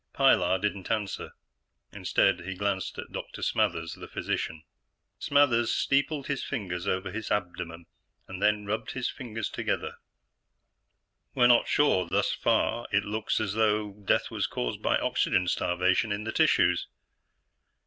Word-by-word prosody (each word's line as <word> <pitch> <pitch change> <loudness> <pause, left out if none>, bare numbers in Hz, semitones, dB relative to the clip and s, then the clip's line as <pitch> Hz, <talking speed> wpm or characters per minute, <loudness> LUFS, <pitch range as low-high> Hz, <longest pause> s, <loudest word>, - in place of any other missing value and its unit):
Pilar 95 -10 +4
didn't 100 -1 -3
answer; 105 -3 -2 0.6
instead, - - +2
he 95 +2 -5
glanced 100 -1 -2
at - - -7
Dr. - - -7
Smathers, 80 0 0
the - - -10
physician. 80 -1 -3 0.6
Smathers 130 -5 +3
steepled 140 +1 +1
his 140 -3 -2
fingers 95 -8 -4
over 95 0 -1
his 110 +2 -5
abdomen 90 -3 -3 0.4
and 105 +2 0
rubbed 110 +2 -3
his 130 -2 -2
fingertips 115 -4 -5
together. - - -2 1.4
"We're 125 - +4
not 120 -1 +5
sure. 145 -11 +3
Thus - - +1
far, 120 +1 +1
it 100 0 +2
looks 105 +1 -1
as 100 -3 -1
though 105 -1 +1
death 100 0 0
was - - -1
caused - - -3
by - - +2
oxygen 90 -1 +1
starvation 90 +5 +1
in 100 +1 -2
the 110 - -3
tissues." - - +3
105 Hz, 140 wpm, -28 LUFS, 95-115 Hz, 1.4 s, not